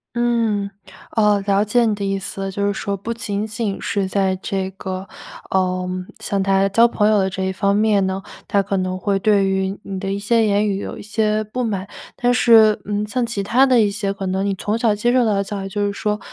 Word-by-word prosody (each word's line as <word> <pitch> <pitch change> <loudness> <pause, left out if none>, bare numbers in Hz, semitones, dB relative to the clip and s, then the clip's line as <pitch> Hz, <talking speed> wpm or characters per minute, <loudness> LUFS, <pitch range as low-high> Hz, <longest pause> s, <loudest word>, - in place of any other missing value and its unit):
嗯， 230 -4 +1 0.5
哦， 210 -2 +3
了 200 0 +3
解 235 +3 +2
你 215 -2 +1
的 200 - -5
意 195 0 -1
思 195 0 -5
了。 195 0 -3
就 200 +1 -1
是 205 - 0
说 200 0 -3
不 225 +5 -4
仅 210 -2 -3
仅 220 -2 -3
是 200 -3 -1
在 190 -1 +1
这 190 0 -3
个 190 0 -6 0.5
嗯， 185 0 -1
像 200 -1 -1
他 195 0 +3
交 230 +4 +4
朋 215 -3 +2
友 215 0 +4
的 190 -1 +1
这 190 0 -4
一 190 - -1
方 200 +1 +1
面 205 -1 +3
呢， 190 +1 -3 0.2
他 200 - +2
可 195 0 -2
能 185 -1 -1
会 200 0 0
对 200 -1 +3
于 190 +1 -1
你 195 - -5
的 195 -1 -2
一 200 - -2
些 225 +2 +2
言 205 0 +2
语 195 -1 -1
有 - - -6
一 - - -9
些 215 0 0
不 250 +4 -3
满。 200 -4 -2 0.3
但 245 -1 +2
是， 225 -3 +6
嗯， 205 0 -2
像 245 +3 -1
其 230 -3 -3
它 245 +7 +3
的 255 -3 +4
一 210 -2 +3
些 200 -1 -2
可 200 0 -5
能 190 +1 -1
你 200 - 0
从 210 +3 -2
小 230 -2 +2
接 235 +4 +1
受 250 -1 +4
到 215 - +2
的 195 - +1
教 200 0 -5
育， 195 - -5
就 205 +1 -1
是 200 - -1
说， 210 0 -2
200 Hz, 260 characters per minute, -20 LUFS, 195-215 Hz, 0.5 s, 是